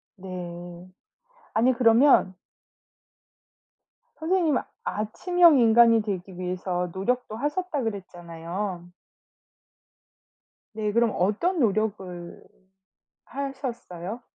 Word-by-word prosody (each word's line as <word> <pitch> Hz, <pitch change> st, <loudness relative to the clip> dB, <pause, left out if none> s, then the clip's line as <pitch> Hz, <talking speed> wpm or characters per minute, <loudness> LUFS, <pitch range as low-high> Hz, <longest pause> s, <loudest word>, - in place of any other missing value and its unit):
네. 175 Hz, -1 st, -8 dB, 0.6 s
아니 250 Hz, +4 st, +3 dB
그러면 230 Hz, -4 st, +4 dB, 1.8 s
선생님은 320 Hz, -4 st, +1 dB, 0.2 s
아침형 325 Hz, -, +3 dB
인간이 230 Hz, -1 st, +6 dB
되기 190 Hz, -3 st, -5 dB
위해서 180 Hz, 0 st, -3 dB
노력도 225 Hz, +3 st, -2 dB
하셨다 295 Hz, +3 st, -2 dB
그랬잖아요. 175 Hz, -2 st, -5 dB, 1.8 s
네. 210 Hz, -1 st, -2 dB
그럼 235 Hz, 0 st, +2 dB
어떤 225 Hz, -, 0 dB
노력을 195 Hz, -6 st, -2 dB, 0.8 s
하셨어요? 245 Hz, -7 st, -6 dB
215 Hz, 185 characters per minute, -25 LUFS, 180-250 Hz, 1.8 s, 인간이